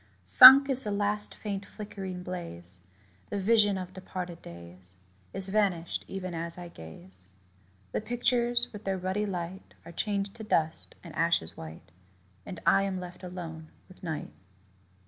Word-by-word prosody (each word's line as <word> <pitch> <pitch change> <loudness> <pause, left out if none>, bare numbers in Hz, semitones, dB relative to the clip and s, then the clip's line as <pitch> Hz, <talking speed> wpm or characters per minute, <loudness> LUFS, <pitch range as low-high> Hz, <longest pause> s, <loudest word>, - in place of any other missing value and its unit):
Sunk 260 - +11
is 265 -1 +1
the 210 - -4
last 205 +1 0
faint 200 -2 -5
flickering 195 -3 -8
blaze: 95 - -8 0.5
The 205 - -3
vision 205 0 +3
of 185 0 -7
departed 180 -2 -7
days 85 +2 -13 0.4
Is 195 0 -5
vanished 190 -5 -1
even 185 -2 -6
as 170 +1 -4
I 175 -1 -8
gaze. 90 - -12 0.6
The - - -2
pictures, 240 +1 +1
with 210 0 -9
their 195 -1 -2
ruddy 190 +3 -2
light, 180 0 -6
Are - - -10
changed 200 +2 -3
to 220 - -8
dust 160 -6 -1
and 170 -4 -11
ashes 165 - 0
white, 80 0 -11 0.6
And 180 - -7
I 195 - +5
am 195 -1 -2
left 180 -1 -10
alone 165 -3 -8 0.2
with 185 - -18
night. 160 -4 -5
185 Hz, 150 wpm, -28 LUFS, 165-205 Hz, 0.6 s, Sunk